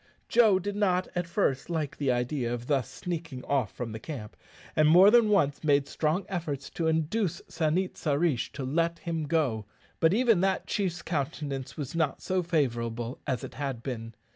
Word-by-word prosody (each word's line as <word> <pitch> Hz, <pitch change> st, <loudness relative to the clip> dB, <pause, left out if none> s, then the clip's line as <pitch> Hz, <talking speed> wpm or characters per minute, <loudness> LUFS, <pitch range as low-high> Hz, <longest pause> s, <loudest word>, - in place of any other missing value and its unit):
Joe 220 Hz, -5 st, +5 dB
did 200 Hz, +2 st, -3 dB
not 185 Hz, -3 st, +1 dB
at 175 Hz, -1 st, -2 dB
first 170 Hz, -7 st, 0 dB
like 155 Hz, -4 st, -2 dB
the 140 Hz, -3 st, +1 dB
idea 125 Hz, 0 st, -1 dB
of 120 Hz, 0 st, -4 dB
thus 135 Hz, -4 st, 0 dB
sneaking 165 Hz, -7 st, -5 dB
off 130 Hz, -8 st, 0 dB
from 120 Hz, -2 st, -5 dB
the 110 Hz, -, -6 dB
camp, 115 Hz, -5 st, -7 dB, 0.4 s
and 155 Hz, -1 st, +5 dB
more 180 Hz, +6 st, +8 dB
than 235 Hz, -2 st, +6 dB
once 145 Hz, -9 st, +2 dB
made 145 Hz, -2 st, +3 dB
strong 160 Hz, +5 st, 0 dB
efforts 155 Hz, -7 st, -4 dB
to 165 Hz, -, -1 dB
induce 165 Hz, +3 st, 0 dB
San 160 Hz, 0 st, 0 dB
it 190 Hz, 0 st, -2 dB
sa 150 Hz, -, 0 dB
rish 145 Hz, -4 st, +1 dB
to 140 Hz, -, -5 dB
let 165 Hz, +5 st, 0 dB
him 165 Hz, -2 st, -3 dB
go; 135 Hz, -10 st, 0 dB, 0.3 s
but 160 Hz, -, +4 dB
even 225 Hz, -3 st, +4 dB
that 190 Hz, 0 st, +1 dB
chief's 180 Hz, -4 st, -2 dB
countenance 140 Hz, -3 st, -3 dB
was 140 Hz, -4 st, -4 dB
not 165 Hz, -4 st, 0 dB
so 185 Hz, 0 st, 0 dB
favourable 120 Hz, -7 st, -1 dB
as 130 Hz, -4 st, -1 dB
it -, -, -7 dB
had 135 Hz, -4 st, -4 dB
been. 115 Hz, -4 st, -5 dB
155 Hz, 190 wpm, -28 LUFS, 130-175 Hz, 0.4 s, more